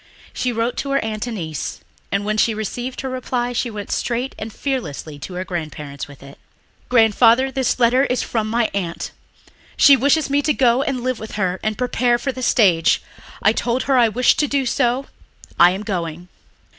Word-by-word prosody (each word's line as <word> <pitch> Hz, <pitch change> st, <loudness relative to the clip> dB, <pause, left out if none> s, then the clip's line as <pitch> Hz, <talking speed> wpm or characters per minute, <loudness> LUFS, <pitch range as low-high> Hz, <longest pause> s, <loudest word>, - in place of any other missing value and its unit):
She 250 Hz, -, -1 dB
wrote 230 Hz, +1 st, -1 dB
to 280 Hz, -, -3 dB
her 275 Hz, 0 st, +1 dB
Aunt 215 Hz, +1 st, -3 dB
Annice, 165 Hz, -, -5 dB, 0.3 s
and 200 Hz, +1 st, 0 dB
when 215 Hz, 0 st, 0 dB
she 220 Hz, +1 st, +2 dB
received 245 Hz, +4 st, -4 dB
her 265 Hz, -, -4 dB
reply 245 Hz, -1 st, -2 dB
she 240 Hz, 0 st, -1 dB
went 210 Hz, -2 st, -7 dB
straight 245 Hz, +3 st, -2 dB
and 220 Hz, +1 st, -6 dB
fearlessly 185 Hz, -, -4 dB
to 180 Hz, +6 st, -8 dB
her 185 Hz, +1 st, -3 dB
grandparents 150 Hz, -5 st, -6 dB
with 140 Hz, -1 st, -14 dB
it. 140 Hz, 0 st, -13 dB, 0.5 s
"Grandfather, 235 Hz, +2 st, +4 dB
this 265 Hz, -2 st, 0 dB
letter 250 Hz, +3 st, +4 dB
is 250 Hz, -, -1 dB
from 220 Hz, -2 st, -2 dB
my 230 Hz, 0 st, +1 dB
aunt. 175 Hz, -4 st, -3 dB, 0.7 s
She 280 Hz, -, +8 dB
wishes 285 Hz, +3 st, +2 dB
me 280 Hz, +1 st, +2 dB
to 300 Hz, +1 st, +1 dB
go 250 Hz, 0 st, +3 dB
and 275 Hz, -3 st, -2 dB
live 255 Hz, -2 st, -1 dB
with 220 Hz, -, -8 dB
her 185 Hz, -3 st, -1 dB
and 215 Hz, 0 st, -2 dB
prepare 245 Hz, -1 st, +1 dB
for 270 Hz, -, -2 dB
the 255 Hz, -, -8 dB
stage. 180 Hz, -10 st, +3 dB, 0.4 s
I 215 Hz, -, +5 dB
told 240 Hz, +2 st, -1 dB
her 275 Hz, -, +1 dB
I 240 Hz, -3 st, +5 dB
wished 245 Hz, +3 st, +2 dB
to 295 Hz, -, +2 dB
do 275 Hz, -1 st, 0 dB
so. 250 Hz, +1 st, +1 dB, 0.5 s
I 175 Hz, -, +8 dB
am 190 Hz, +3 st, -3 dB
going." 175 Hz, -4 st, -4 dB
235 Hz, 195 wpm, -20 LUFS, 200-255 Hz, 0.7 s, She